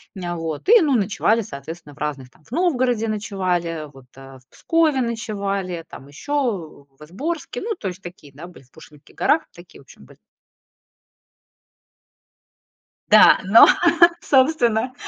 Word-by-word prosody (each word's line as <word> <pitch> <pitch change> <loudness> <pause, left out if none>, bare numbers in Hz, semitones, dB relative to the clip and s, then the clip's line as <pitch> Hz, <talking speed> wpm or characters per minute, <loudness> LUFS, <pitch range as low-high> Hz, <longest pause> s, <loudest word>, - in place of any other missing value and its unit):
М, 175 -2 -5
вот. 165 - -6
И 460 -1 +6
ну 285 -5 +1
ночевали, 215 +2 +1
соответственно, 155 -2 -10
в - - -21
разных 140 -4 -5
там 155 - -27
В - - -26
Новгороде 255 -9 0
ночевали, 185 -6 -3
вот, 135 -1 -16
э, 135 -1 -14
в 125 - -31
Пскове 315 -5 0
ночевали, 200 -7 -4
там 135 - -13
ещё 180 - -4
в 150 - -13
Изборске. 290 - -6
Ну 450 -1 -4
то 210 - -7
есть 185 +1 -10
такие, 175 -6 -13
да, 155 +5 -11
были 180 - -16
в 130 - -30
Пушкинских 150 -2 -18
горах. 305 +3 +1
Такие 175 0 -16
в - - -19
общем 100 - -18
были. - - -20 2.9
Да, - - +7
но, 200 +5 +7 0.5
собственно, 255 -4 +1
195 Hz, 145 wpm, -21 LUFS, 155-250 Hz, 2.9 s, Да